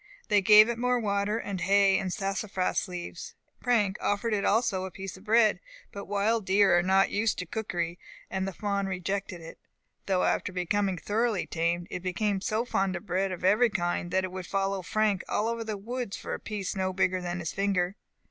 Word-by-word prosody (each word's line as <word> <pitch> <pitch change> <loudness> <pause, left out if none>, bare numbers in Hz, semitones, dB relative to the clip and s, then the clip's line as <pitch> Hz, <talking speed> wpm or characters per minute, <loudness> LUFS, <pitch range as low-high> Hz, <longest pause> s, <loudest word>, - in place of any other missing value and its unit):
They 205 -1 +4
gave 210 +2 +8
it 235 -1 -3
more 250 0 +2
water, 205 0 0
hay 195 +1 +2
and 190 -2 -3
sassafras 195 0 -1
leaves. 180 -1 -7 0.3
Frank 210 -6 +2
offered 205 +2 0
it 200 - 0
also 220 -4 +1
a - - -5
piece 190 +1 -7
of 190 +2 -15
bread; 220 0 +4 0.3
but 200 -2 -7
wild 205 +3 +1
deer 190 -1 +4
are 175 - +4
not 190 +2 +3
used 210 +1 +1
to 180 - -4
cookery, 175 -3 -3 0.3
and 190 0 -2
the - - -2
fawn 200 +1 -2
rejected 190 -1 -3
it; 165 - -11 0.5
though, 190 -2 +2
after - - 0
becoming 190 +1 0
thoroughly 215 +1 0
tamed, 170 +1 -1
it 180 - -4
became 195 +2 -1
so 225 +2 -1
fond 195 -5 0
of - - -6
bread 190 0 0
of 180 - -6
every 215 +6 +4
kind, 175 -3 -1
that 190 +1 +1
it 185 - -4
would 185 -1 -6
follow 195 -1 -1
Frank 205 +1 0
all 215 - 0
over 230 0 -2
the 215 -2 -4
woods 235 +1 -4
for - - -5
a - - -4
piece 205 -3 -4
no 190 -1 -1
bigger 185 0 +1
than 175 0 -3
his 165 -3 -4
finger. 195 -2 0
195 Hz, 200 wpm, -28 LUFS, 185-210 Hz, 0.5 s, gave